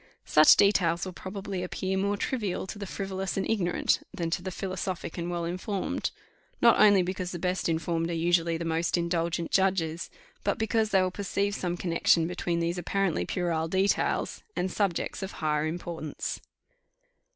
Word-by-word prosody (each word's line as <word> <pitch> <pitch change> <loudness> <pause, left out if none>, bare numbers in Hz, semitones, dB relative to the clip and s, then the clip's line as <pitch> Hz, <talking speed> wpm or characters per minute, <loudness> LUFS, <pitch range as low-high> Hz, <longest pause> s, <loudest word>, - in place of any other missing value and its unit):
Such 155 0 +7
details 180 -3 +3
will 185 - -6
probably 190 0 -5
appear 185 +1 -2
more 200 +1 0
trivial 210 -6 -2
to 205 +2 -7
the 200 - -5
frivolous 195 -1 -3
and 195 - 0
ignorant 180 -6 +1
than 170 -4 -3
to 175 - 0
the 185 - -4
philosophic 185 -2 -4
and 170 -1 -3
well 170 -1 -2
informed: 185 +3 -2 0.5
not 235 - +6
only 205 -3 +7
because 185 0 -3
the 175 - -4
best 180 0 -1
informed 165 0 0
are - - -2
usually 170 0 +2
the 170 - -4
most 165 +2 +1
indulgent 170 -1 -1
judges, 185 -4 +1 0.3
but - - 0
because 220 0 +1
they 190 -3 +4
will 185 - 0
perceive 200 +1 -1
some 175 -2 -2
connexion 170 -1 +3
between 175 0 -2
these 170 +1 -1
apparently 195 0 0
puerile 170 -3 -1
details 190 +4 +1
and 185 +1 -1
subjects 195 -2 -1
of 190 0 -5
higher 150 0 0
importance. 165 -2 -4
180 Hz, 165 wpm, -28 LUFS, 170-195 Hz, 0.5 s, Such